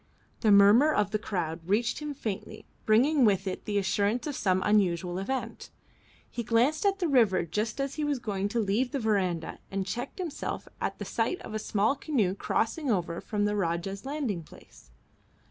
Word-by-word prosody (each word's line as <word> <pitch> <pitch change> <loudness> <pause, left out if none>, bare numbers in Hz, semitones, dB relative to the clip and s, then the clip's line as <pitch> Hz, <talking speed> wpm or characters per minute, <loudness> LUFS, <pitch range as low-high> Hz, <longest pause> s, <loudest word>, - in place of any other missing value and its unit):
The 220 - +2
murmur 205 +9 +7
of 210 -7 +1
the 215 - 0
crowd 175 -6 -3
reached 210 +7 0
him 300 -1 -5
faintly, 215 -3 -5 0.2
bringing 260 +7 +4
with 200 -3 +3
it 190 - -4
the 205 -1 -1
assurance 205 +4 +1
of 295 -3 -3
some 185 -4 +1
unusual 180 -4 +2
event. 260 +7 -4 0.6
He 240 - -5
glanced 245 - +2
at 395 0 +2
the 360 -3 0
river 220 - +3
just 210 - -2
as 275 0 -1
he 305 - -3
was 295 -2 0
going 205 -4 -2
to 235 - -1
leave 225 +6 0
the 275 - 0
verandah 190 -7 -1
and 195 -1 -2
checked 235 +6 -5
himself 350 -6 -4
at - - -2
the - - -6
sight 365 - -1
of 215 - -8
a 215 - -1
small 215 +5 +1
canoe 240 - 0
crossing 255 +8 -1
over 175 -5 -1
from 205 -2 -1
the 210 0 0
Rajah's 195 +1 -2
landing 270 - -2
place. 155 - -17
215 Hz, 185 wpm, -28 LUFS, 195-260 Hz, 0.6 s, murmur